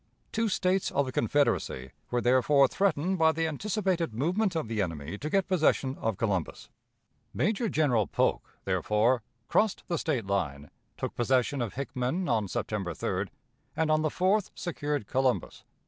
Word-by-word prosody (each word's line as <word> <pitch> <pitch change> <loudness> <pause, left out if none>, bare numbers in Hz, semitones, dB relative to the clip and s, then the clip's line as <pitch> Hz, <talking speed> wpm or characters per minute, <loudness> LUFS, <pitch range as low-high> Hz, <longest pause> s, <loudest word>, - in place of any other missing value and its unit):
Two 225 0 0
States 185 0 +1
of 140 0 +1
the 130 - -4
Confederacy 115 - 0 0.2
were 120 0 0
therefore 130 +3 +4
threatened 180 +4 0
by 160 0 +5
the 165 0 -1
anticipated 180 - -1
movement 180 - 0
of 160 -8 -1
the 110 -2 -1
enemy 80 -2 -4
to 150 - -4
get 195 +3 +1
possession 155 -7 +2
of 110 -3 -1
Columbus. 100 -7 -2 0.7
Major 210 - +1
General 125 - +2
Polk, - - -1
therefore, 115 +4 +2 0.3
crossed 215 -2 +1
the 170 - 0
State 130 -9 -1
line, 75 -8 -2 0.3
took - - -3
possession 130 +2 +1
of 115 -4 -3
Hickman 135 +6 -2
on 110 -5 +1
September 95 -1 -3
3d, - - -2 0.5
and 160 -1 +2
on 155 0 +3
the 155 - +1
4th 190 +5 +1
secured 150 - -3
Columbus. 130 +3 -1
140 Hz, 155 wpm, -29 LUFS, 115-175 Hz, 0.7 s, by